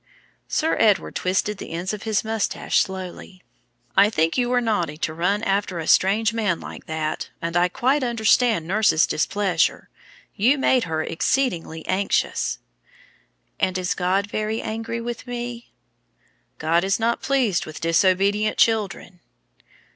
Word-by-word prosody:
Sir 320 +1 0
Edward 210 -3 +3
twisted 195 +2 -1
the - - -7
ends 175 +4 -3
of 210 - -6
his 215 - +1
moustache 220 -2 0
slowly. 185 0 -5 0.5
"I 200 +2 +6
think 165 -5 +1
you 245 -1 +1
were 250 0 +3
naughty 175 -10 -1
to 160 0 -2
run 195 +6 0
after 195 -3 0
a 165 - -4
strange 210 +6 +3
man 210 -7 0
like - - -10
that, 155 -1 -3
and 170 0 -4
I 175 +1 +4
quite 265 +7 +1
understand 230 -5 +2
nurse's 200 -4 +3
displeasure. 185 0 0 0.4
You 240 +8 +3
made 260 -3 +2
her 160 -1 -2
exceedingly 165 -6 -1
anxious." 195 +2 0 1.0
"And 185 0 +1
is 180 -1 -1
God 185 +2 0
very 215 +2 -2
angry 225 +1 -4
with 240 +1 -6
me?" 240 -1 -6 0.9
"God 165 +3 +1
is 195 +3 +1
not 230 +1 0
pleased 250 -12 +1
with 155 - -8
disobedient 195 +5 +2
children." 200 -5 0
200 Hz, 140 wpm, -23 LUFS, 175-225 Hz, 1.0 s, I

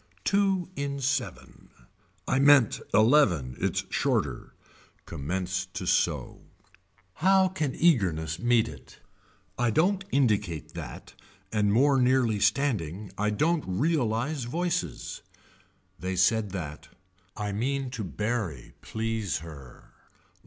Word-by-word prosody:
Two 195 -3 +1
in 140 0 -3
seven 145 +2 -3 0.6
I 135 - +2
meant 140 -5 +5
eleven 105 - +4
it's - - 0
shorter. - - -1 0.5
Commence 90 +5 -3
to - - -4
sew. - - 0 0.8
How 190 +2 +4
can 160 -8 -2
eagerness 85 - +1
meet 120 -2 +3
it. 70 -4 -12 0.6
I 120 -1 +2
don't 185 - +2
indicate 105 - 0
that - - -8 0.4
and 105 -2 +2
more 135 +4 +4
nearly 125 -4 +2
standing 100 - 0
I 105 +2 0
don't 155 +9 +1
realize 125 - 0
voices. 175 +7 -3 0.8
They 95 +1 -3
said 105 +4 +2
that. 80 -6 -6 0.5
I 105 -1 -3
mean 130 +5 -2
to 115 -5 -4
bury 100 - -3
please 110 -6 -2
her. 70 -6 -13
115 Hz, 110 wpm, -27 LUFS, 95-140 Hz, 0.8 s, meant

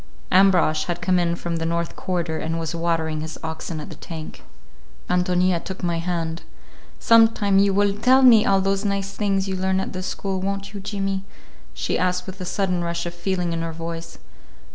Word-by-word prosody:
Ambrosch 180 -5 +4
had 175 -1 -3
come 180 0 +2
in 170 -1 +1
from 170 -1 -3
the 165 - -3
north 170 0 -2
quarter, 170 -3 -2
and 165 +1 -2
was 165 0 -3
watering 165 -2 -1
his 160 +1 -6
oxen 160 0 -5
at 150 - -8
the - - -8
tank. 160 -2 -8 0.7
Ántonia 180 -1 +2
took 190 -1 -7
my 170 -1 0
hand. 165 -1 -2 0.6
"Sometime 225 -4 +5
you 200 0 +4
will 200 0 +2
tell 255 +5 +4
me 230 -4 +8
all 195 -1 +3
those 195 +1 0
nice 200 -1 -1
things 195 -2 0
you 190 - -2
learn 190 0 0
at 190 - -4
the 185 - -4
school, 190 0 -3
won't 200 +1 -3
you, 200 - -5
Jimmy?" 195 -1 -3 0.5
she - - -1
asked 180 0 0
with 190 0 -8
a - - -3
sudden 180 -2 -1
rush 170 0 -2
of 175 - -4
feeling 175 -1 -2
in 165 - -2
her 165 0 -3
voice. 165 0 -6
180 Hz, 195 wpm, -23 LUFS, 170-195 Hz, 0.7 s, me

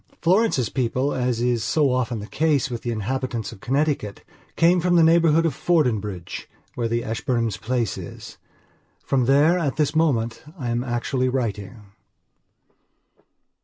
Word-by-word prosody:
Florence's 180 - +2
people, 130 +2 -1
as 125 -2 -1
is 120 -2 +1
so 140 +4 +2
often 125 -2 -1
the 105 - -6
case 145 0 0
with 120 - -4
the 120 - -4
inhabitants 120 +1 -3
of - - -12
Connecticut, 135 -6 -1 0.3
came 175 +2 +4
from 180 +1 +2
the 170 - +6
neighbourhood 165 0 +4
of 160 - +1
Fordingbridge, 110 - -1 0.2
where 120 -2 -2
the 115 +1 -1
Ashburnhams' 115 -1 -1
place 120 -2 -1
is. - - -10 0.7
From 130 -3 +1
there, 145 +7 +4
at 145 -6 -1
this 150 0 0
moment, 120 -8 +1 0.2
I 125 -6 -3
am 120 +1 -1
actually 130 +1 -1
writing. 110 -4 -3
125 Hz, 145 wpm, -23 LUFS, 115-150 Hz, 0.7 s, the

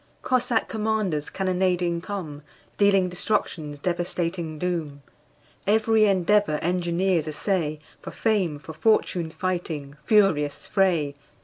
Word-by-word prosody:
Cossack 245 -3 +1
commanders 215 -8 -1
cannonading 180 -2 0
come, 170 -7 -6 0.3
Dealing 195 -2 +4
destruction's 175 -5 -2
devastating 170 0 -2
doom. 155 -5 -3 0.6
Every 220 +1 +4
endeavor 195 -3 +3
engineers 175 -1 +1
essay, 155 -1 -1 0.2
For - - -7
fame, 195 -9 0
for 155 +2 -10
fortune 175 -1 +1
fighting 160 -5 -4
furious 195 - +3
fray! 175 -8 +1
180 Hz, 100 wpm, -25 LUFS, 155-200 Hz, 0.6 s, Dealing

